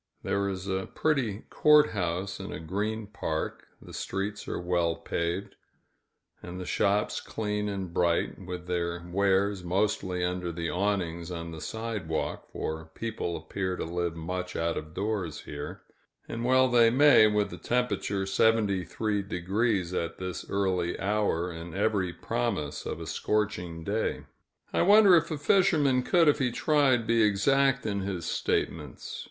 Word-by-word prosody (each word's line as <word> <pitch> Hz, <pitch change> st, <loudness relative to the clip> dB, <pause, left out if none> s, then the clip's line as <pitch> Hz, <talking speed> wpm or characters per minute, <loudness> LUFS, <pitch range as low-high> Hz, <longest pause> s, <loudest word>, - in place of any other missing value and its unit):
There 100 Hz, 0 st, 0 dB
is 95 Hz, 0 st, -5 dB
a 95 Hz, 0 st, -2 dB
pretty 130 Hz, -10 st, 0 dB
court 150 Hz, 0 st, +5 dB
house 90 Hz, 0 st, -2 dB
in -, -, -6 dB
a -, -, -5 dB
green 105 Hz, +7 st, -2 dB
park, 80 Hz, -6 st, -4 dB
the -, -, -13 dB
streets 100 Hz, +2 st, -4 dB
are -, -, -3 dB
well 85 Hz, -2 st, +1 dB
paved, 85 Hz, +3 st, -3 dB, 0.9 s
and 90 Hz, +1 st, -7 dB
the 90 Hz, -, -5 dB
shops 100 Hz, +3 st, +1 dB
clean 105 Hz, -1 st, -2 dB
and 95 Hz, -3 st, -4 dB
bright, 85 Hz, +2 st, +1 dB
with 90 Hz, -1 st, -6 dB
their 85 Hz, -1 st, -2 dB
wares 95 Hz, +1 st, +1 dB
mostly 95 Hz, 0 st, 0 dB
under 90 Hz, -1 st, -2 dB
the 85 Hz, 0 st, -3 dB
awnings 90 Hz, -3 st, -1 dB
on 85 Hz, -1 st, -5 dB
the 80 Hz, -1 st, -8 dB
sidewalk, 110 Hz, -8 st, -3 dB
for 80 Hz, 0 st, -4 dB
people 110 Hz, -7 st, -3 dB
appear 95 Hz, -2 st, -3 dB
to -, -, -4 dB
live 85 Hz, 0 st, -2 dB
much 90 Hz, +3 st, -4 dB
out 85 Hz, 0 st, 0 dB
of 75 Hz, +1 st, -6 dB
doors 100 Hz, -5 st, -2 dB
here 70 Hz, 0 st, -7 dB, 0.4 s
and 115 Hz, 0 st, -4 dB
well 130 Hz, +1 st, +5 dB
they 120 Hz, -2 st, +5 dB
may, 130 Hz, -3 st, +7 dB
with 105 Hz, -1 st, +1 dB
the -, -, -7 dB
temperature 120 Hz, -5 st, 0 dB
73° 100 Hz, -1 st, +1 dB
at 85 Hz, -, -6 dB
this 90 Hz, -1 st, -5 dB
early 95 Hz, -3 st, 0 dB
hour, 100 Hz, -4 st, 0 dB
and 85 Hz, 0 st, -8 dB
every 100 Hz, -3 st, +1 dB
promise 70 Hz, -1 st, -2 dB
of -, -, -4 dB
a -, -, -6 dB
scorching 90 Hz, -6 st, -1 dB
day. 105 Hz, +5 st, -1 dB, 0.5 s
I -, -, +2 dB
wonder 200 Hz, 0 st, +7 dB
if 165 Hz, 0 st, +3 dB
a 155 Hz, -, -2 dB
fisherman 145 Hz, -6 st, +3 dB
could, 170 Hz, +5 st, +3 dB
if 145 Hz, -, +4 dB
he 125 Hz, -3 st, +1 dB
tried, 135 Hz, -3 st, +3 dB
be 115 Hz, 0 st, +3 dB
exact 125 Hz, +5 st, +3 dB
in 100 Hz, -2 st, -1 dB
his 95 Hz, -3 st, -3 dB
statements. 75 Hz, -6 st, -2 dB
95 Hz, 150 wpm, -28 LUFS, 85-110 Hz, 0.9 s, may